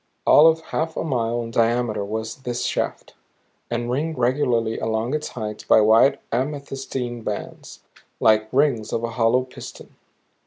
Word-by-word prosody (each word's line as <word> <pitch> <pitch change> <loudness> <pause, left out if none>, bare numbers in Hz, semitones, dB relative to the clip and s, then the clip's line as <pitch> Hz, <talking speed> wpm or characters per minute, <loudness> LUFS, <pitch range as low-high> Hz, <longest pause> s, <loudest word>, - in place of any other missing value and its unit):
All 155 - +7
of 160 0 +3
half 160 0 -2
a - - -1
mile 120 -5 -1
in 115 - -7
diameter 115 -2 +1
was 110 +2 -4
this 125 -2 -4
shaft, - - -3 0.6
and 120 0 -2
ringed 155 +5 -2
regularly 120 -3 +1
along 110 +3 -1
its 155 0 -2
height 105 -3 -6
by - - +7
wide 115 +6 +5
amethystine 135 -2 -3
bands 105 -1 -6 0.4
like 110 0 +3
rings 130 -6 +1
of 115 - -2
a 115 - -2
hollow 115 +2 +2
piston. 130 - -11
120 Hz, 150 wpm, -22 LUFS, 110-135 Hz, 0.6 s, All